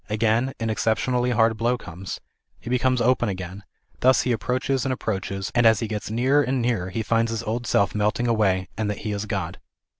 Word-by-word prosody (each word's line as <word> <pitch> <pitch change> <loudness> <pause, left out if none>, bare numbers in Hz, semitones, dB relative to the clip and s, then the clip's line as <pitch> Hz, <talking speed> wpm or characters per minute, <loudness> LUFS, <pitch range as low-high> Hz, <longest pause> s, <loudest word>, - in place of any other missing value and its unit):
Again 115 +4 +1
an 115 -1 -1
excep 110 +1 +1
tionally 125 -1 0
hard 115 -1 +3
blow 120 +2 +1
comes. 95 -3 -7 0.4
He 120 - -7
becomes 125 0 +2
open 125 -2 +2
again; 95 +1 -6 0.4
thus 130 +1 +4
he 125 - 0
approaches 130 +3 0
and 135 - -1
approaches, 100 -5 -3
and 120 - +3
as 110 -2 +5
he 115 - -2
gets 105 -2 -4
nearer 130 +6 +3
and 135 -1 0
nearer 115 -7 0
he 110 +4 -3
finds 115 +1 +1
his 115 -2 -3
old 120 +2 -3
self 100 - +2
melting 105 +3 0
away, 100 -5 +2
and 110 0 -2
that 105 - -2
he 105 - -1
is 100 +1 -3
God. 90 -3 -3
115 Hz, 210 wpm, -24 LUFS, 105-125 Hz, 0.4 s, as